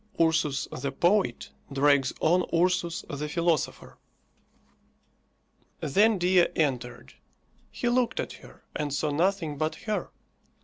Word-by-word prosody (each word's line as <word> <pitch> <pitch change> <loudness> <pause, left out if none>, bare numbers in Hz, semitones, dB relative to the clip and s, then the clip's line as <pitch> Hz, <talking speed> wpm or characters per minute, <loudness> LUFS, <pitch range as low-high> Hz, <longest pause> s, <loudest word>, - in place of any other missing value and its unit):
URSUS 160 -4 +1
THE 140 0 -2
POET 190 +8 +1 0.2
DRAGS 140 -1 +3
ON 175 +3 +4
URSUS 175 0 +1
THE 150 +1 -4
PHILOSOPHER. 165 -2 -1 1.8
Then 205 +9 +3
Dea 180 0 +4
entered. 130 -6 -2 0.6
He 240 - -3
looked 245 0 +1
at - - -3
her, - - -16
and 150 -1 -2
saw 145 +2 -1
nothing 165 -2 0
but 155 0 -1
her. 215 -1 -2
160 Hz, 115 wpm, -27 LUFS, 145-185 Hz, 1.8 s, ON